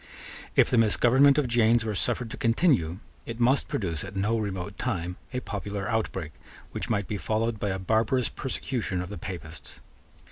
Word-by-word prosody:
If - - +6
the 125 - +4
misgovernment 125 +6 +5
of 145 -4 +2
James 115 -1 +3
were 110 - -1
suffered 115 +4 0
to - - -5
continue, 115 - +2 0.3
it 115 0 -6
must 130 +3 +3
produce, 85 -7 -2
at - - -8
no 105 +4 +1
remote 100 -3 -4
time, 90 -7 -2
a 125 -1 -3
popular 100 -2 -4
outbreak, 95 -8 -2 0.4
which - - -3
might 100 -2 0
be 105 - -3
followed 110 +2 -1
by 100 - -1
a 95 - -1
barbarous 110 +6 +1
persecution 125 -7 -3
of 90 - -8
the 100 -3 -7
Papists. 85 -4 -8
110 Hz, 175 wpm, -27 LUFS, 95-120 Hz, 0.4 s, If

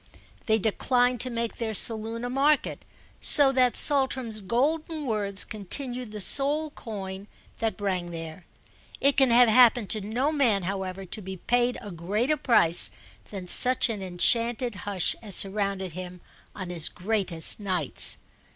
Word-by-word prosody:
They 220 -1 +3
declined 245 +3 0
to 255 - -2
make 235 -1 -4
their 220 -2 -3
saloon 225 +2 +1
a - - -4
market, 285 +3 0 0.4
so 280 -2 +7
that 255 -2 +1
Saltram's 260 -6 0
golden 300 - -2
words 205 -4 -1
continued 245 +3 -4
the 210 - -7
sole 290 +8 0
coin 195 -5 -8 0.3
that 225 -1 -3
rang 185 -4 -3
there. 165 +1 -9 0.5
It 280 0 +2
can 270 -2 +4
have 240 +1 +5
happened 235 -2 +4
to 215 - 0
no 240 +9 -2
man, 240 -10 +1
however, 190 0 -5
to 210 - -6
be 190 0 -8
paid 245 +5 0
a 205 - -9
greater 205 - -1
price 175 - +4 0.4
than 195 -3 -8
such 255 +5 +3
an 215 -3 -5
enchanted 230 +6 0 0.2
hush 190 -4 -1
as 205 -5 -2
surrounded 195 -2 0
him 180 +1 -9 0.3
on 185 -3 -7
his 165 -3 0
greatest 185 -5 +2
nights. 190 -3 0
220 Hz, 150 wpm, -25 LUFS, 190-250 Hz, 0.5 s, so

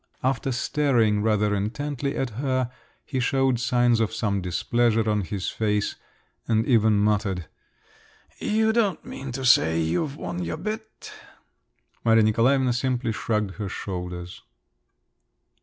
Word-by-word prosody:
After 130 0 0
staring 125 -5 +1
rather 105 -1 +2
intently 140 +7 -2
at 130 -3 -1
her, 130 +1 -1 0.3
he 130 - -3
showed 135 -1 +1
signs 120 -1 +2
of 110 -2 +1
some 105 -3 -1
displeasure 115 +5 +1
on 105 -1 +1
his 95 +1 -3
face, 105 -2 -1 0.5
and 110 -1 +2
even 110 -4 +4
muttered, 100 -4 +1 0.9
"You 220 +1 +1
don't 210 -7 +1
mean 135 -1 -7
to 130 +1 -4
say 80 -9 +5
you've 90 - -1
won 90 0 -4
your 85 - -3
bet?" 215 +5 -6 0.9
Maria 115 -1 +5
Nikolaevna 125 +4 +3
simply 125 -1 -1
shrugged 105 -2 -2
her 105 -3 -4
shoulders. 90 -2 -6
115 Hz, 125 wpm, -25 LUFS, 105-130 Hz, 0.9 s, say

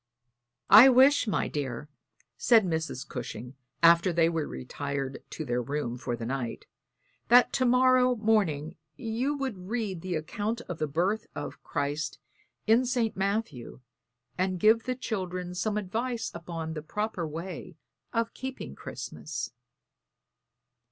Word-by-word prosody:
"I 220 +7 +11
wish, 265 +1 +5
my 210 - 0
dear," 140 -1 -4 0.5
said 225 -4 +5
Mrs. 160 -5 -3
Cushing, 125 -1 -6 0.3
after 170 +2 +6
they 165 -1 +3
were 160 -3 -2
retired 135 - -4
to 155 - -5
their 125 -2 0
room 140 -2 -3
for 125 -1 -3
the 115 -1 -6
night, 125 -1 -4 0.6
"that 245 +1 +6
to 260 - +2
morrow 255 0 +4
morning 200 -10 +1 0.2
you 250 +5 -2
would 225 -10 -4
read 215 -7 -2
the 185 -1 -3
account 210 +9 -3
of 175 -8 -7
the 155 - 0
birth 185 +9 0
of 145 - -6
Christ 145 +2 -2 0.5
in 225 +3 +5
St. 240 -3 0
Matthew, 195 - -2 0.6
and 185 -1 0
give 220 +4 +4
the 255 - -1
children 185 -7 -4
some 205 +4 -1
advice 225 +4 -2
upon 165 -1 -5
the 155 - -5
proper 200 +1 -3
way 170 +2 -7 0.4
of 230 -1 -1
keeping 265 0 -6
Christmas." - - -6
185 Hz, 135 wpm, -28 LUFS, 155-225 Hz, 0.6 s, I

